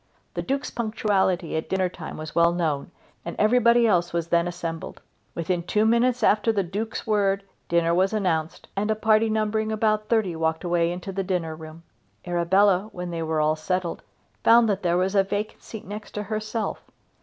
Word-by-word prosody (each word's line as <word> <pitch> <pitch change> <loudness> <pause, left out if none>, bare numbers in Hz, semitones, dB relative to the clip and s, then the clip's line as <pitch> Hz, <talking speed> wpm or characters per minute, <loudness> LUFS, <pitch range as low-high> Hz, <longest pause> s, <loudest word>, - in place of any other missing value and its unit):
The - - -2
Duke's 275 +2 -2
punctuality 195 -7 0
at 160 - -3
dinner 190 -1 +1
time 175 -2 -8
was 155 0 -7
well 170 0 +4
known, 155 -5 -1 0.3
and 170 - -6
everybody 235 +1 +4
else 175 -6 +2
was 170 -1 -2
then 170 0 +2
assembled. 170 -2 -5 0.4
Within 170 +1 -1
two 210 +5 +1
minutes 235 +2 +2
after 215 +2 +4
the 200 -3 0
Duke's 205 +6 -4
word 200 -3 +1 0.3
dinner 170 0 +2
was 185 +2 +2
announced, 170 -7 -1
and 205 +2 -1
a 220 - +2
party 220 +1 +3
numbering 215 0 0
about 215 -1 +1
thirty 215 -7 +1
walked 160 +1 -1
away 170 -1 +1
into 180 +2 -5
the 195 +1 -2
dinner 175 -4 -2
room. 160 +1 -11 0.4
Arabella, 185 +3 +2
when 180 -1 -5
they 165 -1 -3
were 160 -1 -1
all 155 0 +2
settled, 175 +2 -2 0.4
found 230 0 +6
that 200 -2 0
there 175 -1 +1
was 185 +2 +1
a 195 -1 +4
vacant 205 +2 -4
seat 220 - -9
next 210 +2 -8
herself. 215 +1 -3
190 Hz, 180 wpm, -25 LUFS, 170-215 Hz, 0.4 s, found